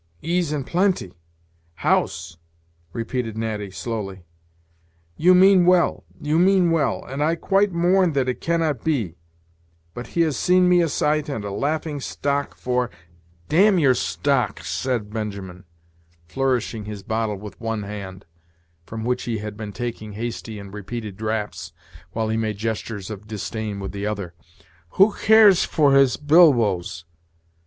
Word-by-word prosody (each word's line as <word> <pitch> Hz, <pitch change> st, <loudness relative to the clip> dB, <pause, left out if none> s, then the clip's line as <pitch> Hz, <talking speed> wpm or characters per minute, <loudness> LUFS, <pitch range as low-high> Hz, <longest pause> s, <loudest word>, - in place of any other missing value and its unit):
"Ease 170 Hz, -1 st, 0 dB
and 145 Hz, -3 st, -2 dB
plenty! 180 Hz, -, 0 dB, 0.6 s
house!" 85 Hz, 0 st, 0 dB, 0.5 s
repeated 115 Hz, +1 st, -3 dB
Natty, 110 Hz, -3 st, -3 dB
slowly. 95 Hz, -3 st, -5 dB, 0.9 s
"You 180 Hz, +3 st, +5 dB
mean 190 Hz, 0 st, +6 dB
well, 180 Hz, 0 st, +3 dB
you 150 Hz, +2 st, +1 dB
mean 185 Hz, -1 st, +4 dB
well, 160 Hz, -4 st, 0 dB
and 135 Hz, +3 st, -5 dB
I 160 Hz, +2 st, +2 dB
quite 195 Hz, +4 st, +2 dB
mourn 175 Hz, 0 st, +2 dB
that 135 Hz, -2 st, +1 dB
it 125 Hz, -, -3 dB
cannot 165 Hz, -6 st, 0 dB
be; 125 Hz, -, 0 dB, 0.8 s
but 120 Hz, -, -7 dB
he -, -, +5 dB
has 155 Hz, -4 st, +1 dB
seen 180 Hz, 0 st, +4 dB
me 180 Hz, -1 st, +5 dB
a 165 Hz, -, +1 dB
sight 150 Hz, +1 st, 0 dB
and 115 Hz, -7 st, -4 dB
a 100 Hz, -, -4 dB
laughing 145 Hz, +7 st, -2 dB
stock 140 Hz, +1 st, -2 dB
for 125 Hz, -1 st, -1 dB, 0.3 s
" -, -, -34 dB, 0.2 s
"Damn 190 Hz, +5 st, +4 dB
your 140 Hz, -6 st, +4 dB
stocks," 135 Hz, +1 st, -1 dB
said 120 Hz, -5 st, -2 dB
Benjamin, 100 Hz, -4 st, -6 dB, 0.6 s
flourishing 125 Hz, -3 st, -1 dB
his 105 Hz, -2 st, -7 dB
bottle 110 Hz, -1 st, -2 dB
with 105 Hz, +1 st, -11 dB
one 115 Hz, -2 st, -2 dB
hand, 100 Hz, -2 st, -8 dB, 0.6 s
from 110 Hz, 0 st, -6 dB
which 125 Hz, +1 st, -1 dB
he 115 Hz, -2 st, -2 dB
had 105 Hz, 0 st, -6 dB
been 105 Hz, -1 st, -6 dB
taking 110 Hz, -2 st, -5 dB
hasty 115 Hz, 0 st, -5 dB
and 100 Hz, -1 st, -10 dB
repeated 105 Hz, 0 st, -6 dB
draughts, 110 Hz, 0 st, -4 dB, 0.4 s
while 110 Hz, -1 st, -2 dB
he 110 Hz, -, 0 dB
made 110 Hz, -2 st, -2 dB
gestures 110 Hz, -2 st, -4 dB
of 105 Hz, 0 st, -9 dB
disdain 105 Hz, 0 st, -4 dB
with 95 Hz, -, -5 dB
the 100 Hz, +1 st, -4 dB
other: 100 Hz, -5 st, -4 dB, 0.6 s
"who 200 Hz, +2 st, +6 dB
cares 215 Hz, -4 st, +6 dB
for 145 Hz, -3 st, +3 dB
his 135 Hz, -2 st, +4 dB
bilboes? 120 Hz, -, +3 dB
120 Hz, 150 wpm, -22 LUFS, 105-155 Hz, 0.9 s, mean